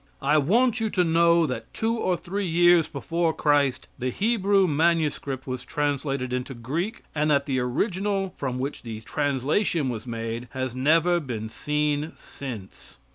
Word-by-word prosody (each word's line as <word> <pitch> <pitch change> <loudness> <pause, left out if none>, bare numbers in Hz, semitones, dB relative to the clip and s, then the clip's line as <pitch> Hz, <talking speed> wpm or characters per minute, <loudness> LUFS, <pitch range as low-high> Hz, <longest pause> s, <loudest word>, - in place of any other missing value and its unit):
I 150 +3 +4
want 235 - +3
you 220 -1 0
to 185 -3 +2
know 170 0 +4
that 130 -4 -5
two 225 +1 0
or 185 -6 0
three 195 +3 -3
years 175 0 +5
before 165 +3 -1
Christ, 140 -3 +2
the 130 0 -1
Hebrew 200 - +2
manuscript 150 -4 0
was 130 -1 -4
translated 140 -2 -2
into 125 +1 -3
Greek, 155 - -3
and 150 0 +1
that 140 -1 +3
the 130 -2 0
original 195 - -1
from 130 -3 -3
which 135 +3 -4
the 110 -2 -7
translation 145 - 0
was 115 0 -5
made, 115 +1 -4
has 130 -2 -3
never 165 +7 +3
been 115 -7 -5
seen 150 +4 -1
since. 115 - -9
150 Hz, 155 wpm, -25 LUFS, 130-175 Hz, -, years